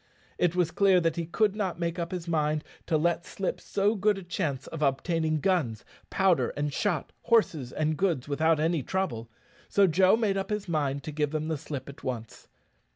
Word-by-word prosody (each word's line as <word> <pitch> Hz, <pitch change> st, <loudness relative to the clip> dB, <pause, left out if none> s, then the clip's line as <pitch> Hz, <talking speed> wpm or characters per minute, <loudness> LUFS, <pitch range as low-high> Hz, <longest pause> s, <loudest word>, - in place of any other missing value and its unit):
It 175 Hz, -1 st, +2 dB
was 175 Hz, -3 st, +2 dB
clear 190 Hz, +1 st, +4 dB
that 165 Hz, -1 st, 0 dB
he 170 Hz, -2 st, -3 dB
could 205 Hz, +3 st, +1 dB
not 190 Hz, -5 st, -2 dB
make 170 Hz, 0 st, -2 dB
up 170 Hz, 0 st, -3 dB
his 180 Hz, -2 st, -5 dB
mind 155 Hz, -2 st, 0 dB, 0.2 s
to 160 Hz, -, +2 dB
let 170 Hz, +2 st, +1 dB
slip 195 Hz, +1 st, -4 dB
so 205 Hz, +2 st, +1 dB
good 210 Hz, -1 st, +2 dB
a 195 Hz, -, -7 dB
chance 145 Hz, -6 st, -2 dB
of 160 Hz, -, -7 dB
obtaining 155 Hz, +2 st, +1 dB
guns, 150 Hz, -, 0 dB, 0.2 s
powder 190 Hz, -3 st, +2 dB
and 145 Hz, -1 st, -1 dB
shot, 175 Hz, -5 st, -1 dB
horses, 160 Hz, -, +2 dB
and 155 Hz, 0 st, 0 dB
goods, 165 Hz, -6 st, 0 dB
without 155 Hz, +2 st, +2 dB
any 160 Hz, 0 st, +1 dB
trouble; 125 Hz, -9 st, -2 dB, 0.4 s
so 200 Hz, -, +5 dB
Joe 185 Hz, +4 st, +4 dB
made 210 Hz, -4 st, +1 dB
up 195 Hz, 0 st, -3 dB
his 210 Hz, -1 st, -2 dB
mind 145 Hz, -4 st, -1 dB
to 155 Hz, -, -5 dB
give 150 Hz, -1 st, 0 dB
them 155 Hz, +1 st, -3 dB
the 160 Hz, -, 0 dB
slip 135 Hz, -2 st, -6 dB
at 140 Hz, -, -11 dB
once. 115 Hz, -3 st, -5 dB
165 Hz, 200 wpm, -28 LUFS, 150-190 Hz, 0.4 s, so